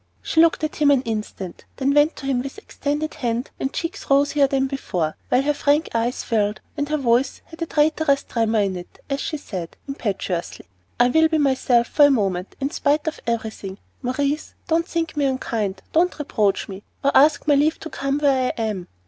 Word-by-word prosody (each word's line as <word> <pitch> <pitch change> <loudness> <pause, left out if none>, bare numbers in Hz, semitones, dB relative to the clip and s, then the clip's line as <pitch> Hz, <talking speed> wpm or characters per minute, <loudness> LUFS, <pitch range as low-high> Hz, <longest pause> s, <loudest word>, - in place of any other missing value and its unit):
She 320 - +3
looked 330 -1 +3
at 310 - -2
him 295 -1 +4
an 275 -2 +4
instant, 210 -5 -5
then 275 +1 +1
went 295 +2 +4
to 275 - -9
him 265 -2 +1
with 275 +8 -7
extended 305 -7 -3
hand 245 -4 -2
and 270 - -1
cheeks 340 +4 -5
rosier 280 +1 +4
than 270 0 +1
before, 180 - -2
while 255 +2 +3
her 295 +1 +2
frank 290 +2 +1
eyes 235 +2 -1
filled, 210 -2 0 0.2
and 290 -1 -2
her 305 - +1
voice 255 0 +1
had 325 +1 -14
a 330 - -1
traitorous 300 -2 +2
tremor 225 -2 +1
in 195 -2 0
it, 175 - -11
as 275 - 0
she 310 - -3
said, 185 - -7
impetuously: 195 - -3 0.3
"I 245 0 +5
will 320 +4 +5
be 320 0 +1
myself 260 -4 +3
for 290 +5 +5
a - - +6
moment, 195 -8 0
in 275 +1 -1
spite 295 +1 +1
of 315 - -2
everything. 220 -4 -3 0.2
Maurice, 280 +4 -2
don't 335 0 +1
think 330 -3 -2
me 290 -1 +1
unkind, 220 -7 -2
don't 350 +3 +2
reproach 215 -9 0
me, 195 0 -8 0.2
or 280 - +4
ask 300 +2 +5
my 295 - +5
leave 295 +3 +2
to 320 - -7
come 275 0 -1
where 270 -3 +2
I - - -6
am. 210 -5 -2
275 Hz, 200 wpm, -22 LUFS, 230-295 Hz, 0.3 s, a